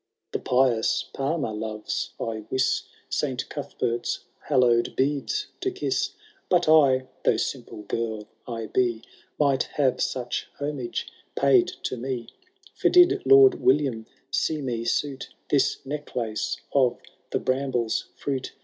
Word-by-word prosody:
^ - - -55
The - - -2
pious 125 -3 +2
Palmer 135 -4 -1
loves, 110 0 -4
I 110 -2 -4
wis, 130 0 +1 0.2
Saint 130 -4 -2
Cuthbert's 125 -5 -2 0.2
hallowed 125 -4 +2
beads 145 - 0
to 385 - 0
kiss; 380 0 -1 0.4
But 175 -2 +3
I, 140 -5 +5 0.2
though - - +3
simple 105 - -4
girl 110 0 -3 0.2
I 115 -2 -4
be, 120 0 0 0.4
Might 140 -3 +3 0.2
have 135 -3 +2
such 125 -1 -2
homage 145 -4 -3 0.3
paid 365 -2 +5 0.2
to 130 - -2
me; 125 -1 -4 0.4
For - - +2
did 360 +2 +6
Lord 405 -1 +7
William 130 -5 +2 0.2
see 155 -1 0
me 120 -4 -3
suit 135 +3 -1 0.2
This 140 - +3
necklace 125 -6 -3 0.2
of 130 -3 +3 0.3
the - - 0
bramble's 130 -4 0
fruit. 135 -2 -3
130 Hz, 130 wpm, -26 LUFS, 115-145 Hz, 0.4 s, Lord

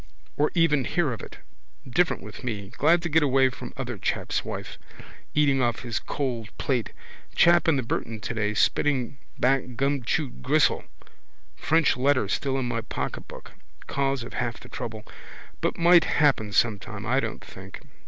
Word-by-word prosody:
Or 150 - +2
even 150 -6 +3
hear 155 -8 0
of 115 - -7
it. - - -10 0.5
Different 175 +8 +1
with - - -10
me. 105 -6 -4
Glad 165 +9 +3
to - - 0
get 160 +1 +4
away 135 -2 +4
from 125 -1 -8
other 120 -5 -4
chap's - - -1
wife. - - -6 0.6
Eating 140 -3 +3
off 120 -2 0
his 115 -2 -2
cold 120 -4 -3
plate. 125 -5 -1 0.4
Chap 170 0 +5
in 165 - +4
the 130 - 0
Burton 115 -1 -3
today 105 -1 -2
spitting 130 +2 +1 0.2
back 130 -1 +1
gumchewed 135 - -1
gristle. - - +2 0.7
French 160 -3 +2
letter 130 -4 +2
still 135 +7 -1
in 130 - -1
my 115 -1 -2
pocketbook. - - -6 0.3
Cause 135 -2 -1
of 120 - -9
half 120 -1 -2
the - - -13
trouble. 110 -2 -6 0.6
But - - 0
might 170 0 +6
happen 135 -8 +2
sometime, 105 -1 0
I 130 +5 +2
don't - - -4
think. - - -11
130 Hz, 160 wpm, -26 LUFS, 115-145 Hz, 0.7 s, might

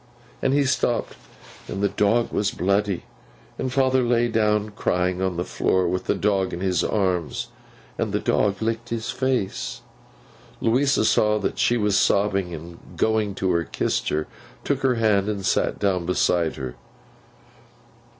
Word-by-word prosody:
And 135 - +2
he 140 0 +3
stopped, 125 -2 0 0.5
and 100 - -4
the - - +5
dog 110 +4 +1
was 105 - +1
bloody, 100 0 0 0.6
and 130 - -2
father 130 -1 +3
lay 120 -1 +2
down 105 -1 +1
crying 90 -3 0
on 95 -2 -1
the 90 - 0
floor 95 -1 +1
with 90 +2 -2
the - - +1
dog 95 -2 0
in 85 - -4
his 90 -3 +1
arms, 90 - -1 0.5
and - - -1
the - - 0
dog 100 +1 +1
licked 115 +1 -2
his 115 -1 -3
face.' 130 -7 -2 0.8
Louisa 130 +1 +2
saw 105 0 +3
that 105 - -3
she 120 - +3
was 105 -2 +2
sobbing; 100 -3 +2
and 85 +1 -9 0.2
going 110 -3 +1
to 95 -2 0
her, 85 - +1
kissed - - -1
her, 75 0 -1 0.4
took 140 -1 -1
her 130 -2 +2
hand, 105 -3 +2
and 100 -3 -3
sat - - +1
down 95 -4 0
beside 90 -2 +1
her. 65 -2 -5
105 Hz, 160 wpm, -23 LUFS, 90-115 Hz, 0.8 s, the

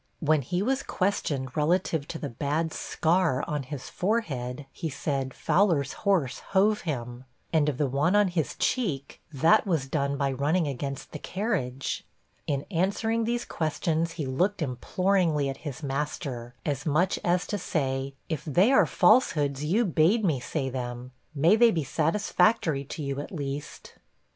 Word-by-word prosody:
When 155 -1 +3
he 175 +9 -1
was 265 +4 +1
questioned 145 - -1
relative 155 -1 +1
to 160 - -5
the 150 - -4
bad 150 +6 -2
scar 160 -5 +1
on 150 -1 -1
his 135 0 -7
forehead, 145 - -2
he 165 - -4
said, 135 -2 -2
'Fowler's 160 -3 +2 0.2
horse 150 -10 +2
hove 205 +2 +2
him.' 125 -5 -5 0.3
And 155 -2 +3
of 140 - -3
the 145 - +2
one 140 +8 +1
on 205 -2 +4
his 170 -4 -1
cheek, 155 - -1
'That 160 +10 +4
was 160 -7 +1
done 140 0 -1
by 140 0 0
running 150 +5 +1
against 140 0 -5
the 150 - -6
carriage.' 170 - -2 0.4
In 140 -2 -1
answering 220 +6 0
these 240 +1 -1
questions, 160 +1 -1
he 155 - -4
looked 175 +8 0
imploringly 155 +2 +1
at 135 - -5
his 145 -1 -7
master, 135 -3 -4
as 145 -3 -1
much 170 +5 +1
as 175 0 +2
to 205 - -3
say, 135 -5 -2
'If 160 -3 -3
they 180 - +3
are 270 - +5
falsehoods, 150 - +3
you 200 +10 +2
bade 185 +5 +3
me 155 -7 +1
say 135 +2 -3
them; 125 0 -5 0.2
may 165 +8 +5
they 235 +1 +6
be 165 -8 0
satisfactory 160 - +1
to 150 +3 -6
you, 140 0 -3
at 145 - -6
least.' 145 -4 -6
155 Hz, 160 wpm, -27 LUFS, 135-185 Hz, 0.4 s, they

